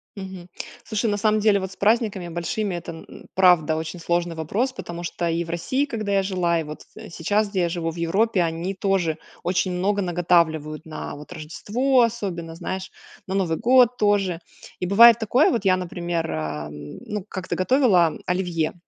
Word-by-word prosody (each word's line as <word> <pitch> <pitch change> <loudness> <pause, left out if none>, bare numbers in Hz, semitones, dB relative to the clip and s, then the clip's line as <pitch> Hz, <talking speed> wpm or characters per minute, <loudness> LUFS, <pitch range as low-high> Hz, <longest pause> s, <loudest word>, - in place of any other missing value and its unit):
Мгм. 190 -3 -8 0.3
Слушай, 220 0 -1
на 205 - 0
самом 215 +1 +2
деле 210 -1 +3
вот 190 -1 -5
с - - -12
праздниками 210 -4 +1
большими 175 +4 -2
это, 170 0 -6
м 165 - -10
м, - - -13
правда 175 -4 +5
очень 160 +2 -5
сложный 170 0 -1
вопрос, 205 - -1
потому 175 -8 -7
что 170 0 -2
и 165 +1 0
в 165 - -11
России, 260 +12 0
когда 215 -7 -4
я 195 -1 +3
жила 180 -3 0
и - - -2
вот 150 0 -8 0.3
сейчас 205 +6 0
где 195 -2 -1
я 170 - +1
живу 165 -1 -2
в - - -12
Европе 190 +5 +1
они 170 +3 -2
тоже 190 -5 0 0.3
очень 180 +1 0
много 200 +3 0
наготавливают 165 -4 +1
на, 155 -1 -6
вот, 150 +3 -12
Рождество, 215 - 0
особенно, 195 -8 -2
знаешь, 185 +2 -5 0.4
на 190 - -3
Новый 175 -5 0
год 245 0 +4
тоже. 200 -5 +1 0.4
И - - -2
бывает 230 +5 +8
такое, 240 +6 +3
вот 235 -5 -1
я, 185 -1 +4
например, 170 -2 -3
э, - - -2
м, 75 -1 -6
ну, 210 -3 -4
как-то 185 -3 -4
готовила 185 - +3
оливье. 175 -3 -1
180 Hz, 185 wpm, -23 LUFS, 165-205 Hz, 0.4 s, бывает